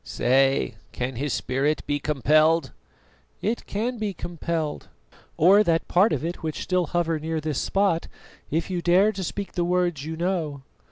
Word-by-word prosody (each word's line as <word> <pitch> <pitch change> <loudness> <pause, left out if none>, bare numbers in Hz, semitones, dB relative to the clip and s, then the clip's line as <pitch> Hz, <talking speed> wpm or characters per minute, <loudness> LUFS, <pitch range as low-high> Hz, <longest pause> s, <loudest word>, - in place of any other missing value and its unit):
"Say, 130 - +1 0.2
can 125 +1 -3
his 145 +2 -2
spirit 135 +6 -1
be 145 0 -1
compelled?" 155 +2 +3 0.7
"It 225 +3 -2
can 230 +4 -2
be 205 -3 -2
compelled, 165 -3 -4 0.5
or 195 +6 +6
that 165 -4 +1
part 195 +6 +4
of - - -1
it 170 +1 -4
which 155 -2 -4
still 180 -2 0
hover 165 -2 0
near 160 +1 -2
this 155 -2 -2
spot, 195 -4 +1 0.4
if 165 +4 -1
you 180 -2 -1
dare 185 +5 +4
to 195 -2 -5
speak 200 +3 -4
the 175 - -1
words 175 -4 0
you 160 +1 -5
know. 165 -6 -2
165 Hz, 165 wpm, -25 LUFS, 150-180 Hz, 0.7 s, or